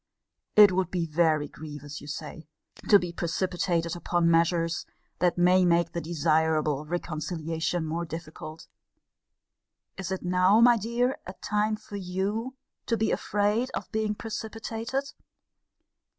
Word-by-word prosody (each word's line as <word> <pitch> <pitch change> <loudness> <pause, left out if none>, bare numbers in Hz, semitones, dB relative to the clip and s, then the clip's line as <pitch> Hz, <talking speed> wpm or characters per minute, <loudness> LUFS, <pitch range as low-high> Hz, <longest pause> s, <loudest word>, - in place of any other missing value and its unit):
It 210 -2 +9
would 185 -1 0
be 175 -2 -1
very 155 -2 +2
grievous, 145 -1 -9
you 145 - -11
say, 155 +1 -7 0.4
to 205 - +9
be 175 -3 -4
precipitated 170 0 -1
upon 175 -1 +1
measures 165 0 +1 0.3
that 180 0 +2
may 180 +1 +5
make 170 -1 +3
the 170 - -3
desirable 155 -2 +1
reconciliation 165 0 -2
more 165 +2 -2
difficult. 160 -1 -8 1.3
Is 195 -1 -5
it 190 - -3
now, 185 +4 +4
my 240 +1 +7
dear, 235 +4 0
a 185 - -6
time 210 +2 0
for 210 -1 -9
you 200 +7 -3 0.3
to 230 - +1
be 220 - +1
afraid 210 +5 0
of - - -5
being 215 -1 -1
precipitated? 225 +5 -4
175 Hz, 130 wpm, -27 LUFS, 165-210 Hz, 1.3 s, It